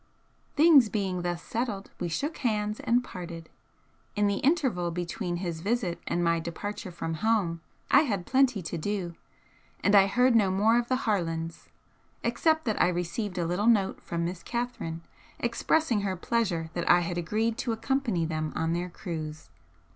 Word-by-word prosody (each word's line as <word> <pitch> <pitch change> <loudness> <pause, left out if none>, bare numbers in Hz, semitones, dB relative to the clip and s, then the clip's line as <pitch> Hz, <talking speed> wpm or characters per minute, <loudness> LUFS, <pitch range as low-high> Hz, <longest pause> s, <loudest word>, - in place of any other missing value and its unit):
'" - - -39
Things 295 -7 +7
being 190 -3 -1
thus 175 -1 -3
settled, 225 -4 -3
we 180 - -1
shook 280 - -2
hands 210 -4 -1
and 245 +2 +2
parted. 170 -6 -8 0.7
In 205 0 +2
the 200 -1 +1
interval 260 - +1
between 175 0 -3
his 170 -2 -4
visit 200 -4 -1
and 175 - 0
my 170 0 +2
departure 180 +4 -5
from 165 -1 -4
home 175 -3 0 0.3
I - - +8
had 200 - -1
plenty 260 -7 +2
to 170 +1 -4
do, 185 -1 -2 0.7
and 200 - +3
I 195 -1 +7
heard 250 +4 +3
no 205 -4 +4
more 215 +5 +3
of 240 - -3
the 255 +1 0
Harlands, 165 -6 -2 0.5
except 315 -2 +1
that 220 -3 0
I - - +5
received 180 +3 -2
a 175 - 0
little 180 +6 0
note 205 -5 +3
from 170 0 -3
Miss 175 0 -4
Catherine 235 -10 -4 0.3
expressing 235 0 +1
her 195 -2 -1
pleasure 180 -5 -1
that 175 - -2
I 175 - +7
had 175 0 -2
agreed 220 +6 0
to 240 - -1
accompany 225 -6 0
them 155 -1 -3
on 165 +1 0
their 175 +1 -2
cruise. 155 -4 -6
195 Hz, 170 wpm, -28 LUFS, 170-230 Hz, 0.7 s, I